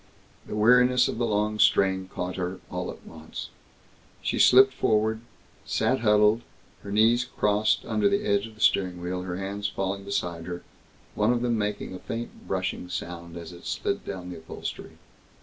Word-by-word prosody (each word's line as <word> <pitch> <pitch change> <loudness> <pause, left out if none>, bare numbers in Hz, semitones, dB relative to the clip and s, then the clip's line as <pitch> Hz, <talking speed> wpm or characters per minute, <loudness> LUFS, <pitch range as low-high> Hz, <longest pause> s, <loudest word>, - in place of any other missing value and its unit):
The - - -5
weariness 125 +3 +5
of - - -4
the 120 - +1
long 105 0 0
strain 95 -2 +3
caught 90 -1 -4
her, 90 0 -3
all - - -3
at - - -10
once. 80 -1 -9 0.7
She - - -1
slipped 130 +1 +7
forward, 110 -1 +1 0.4
sat - - +1
huddled, 105 0 +4 0.4
her 100 - -8
knees 115 +3 +4
crossed 105 -2 +1
under 210 -2 +2
the 200 +1 0
edge 100 +1 +1
of 110 - -15
the 110 - -13
steering 90 -2 +2
wheel, 90 +1 -3
her 90 -1 -4
hands 100 +1 -3
falling 100 -1 -3
beside 85 -4 -3
her, 90 0 -6 0.5
one 105 +3 +2
of 120 0 0
them 120 -1 +1
making 105 -2 -2
a 90 - -7
faint 115 +4 -7
brushing 90 - -2
sound 85 -1 -6
as 85 -1 -8
it 85 0 -11
slid - - -2
down 90 -2 -6
the - - -7
upholstery. 80 - -7
105 Hz, 175 wpm, -26 LUFS, 90-110 Hz, 0.7 s, slipped